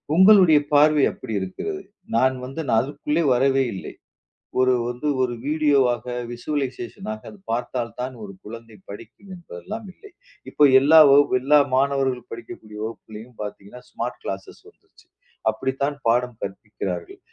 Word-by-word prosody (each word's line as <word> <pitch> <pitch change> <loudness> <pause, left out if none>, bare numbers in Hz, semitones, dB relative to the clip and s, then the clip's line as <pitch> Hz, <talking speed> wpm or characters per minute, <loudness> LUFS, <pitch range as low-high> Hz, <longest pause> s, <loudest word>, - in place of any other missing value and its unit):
உங்களுடைய 185 -5 +7
பார்வை 150 0 +5
அப்டி 110 - -8
இருக்கிறது. 380 - -5 0.3
நான் 130 +2 +3
வந்து 135 +5 -6
நான் 110 - +3
அதுக்குள்ளே 150 +4 -2
வரவே 135 +2 +2
இல்லை. 95 - -8 0.7
ஒரு 130 0 +4
வந்து 125 +5 -4
ஒரு 125 -1 0
வீடியோவாக 140 -6 +2 0.3
விஷுவலைசேஷன் 130 -2 -5
ஆகப் 110 - -11
பார்த்தால் 120 -1 -3
தான் 130 +1 -4
ஒரு 100 -1 -9
குழந்தை 115 +1 -11
படிக்கும் 115 - -12
என்பதெல்லாம் 190 - -9
இல்லை. 410 - -16 0.4
இப்ப 145 -1 +5
எல்லா 155 +4 +6
வகுப்பும் 140 -2 +5
எல்லா 145 +3 +5 0.2
மாணவர்கள் 135 -2 0
படிக்கக்கூடிய 110 -2 -10
வகுப்பிலேயும் 110 +1 -9
பாத்தீங்கன்னா 105 +3 -8
ஸ்மார்ட் 120 +2 -5
கிளாஸ்சஸ் 95 0 -7
வந்துருச்சு. - - -27 0.4
அப்டித்தான் 135 +5 -2
பாடம் 120 0 +1
கற்பிக்கிறார்கள். 95 -3 -6
130 Hz, 130 wpm, -23 LUFS, 115-145 Hz, 0.7 s, உங்களுடைய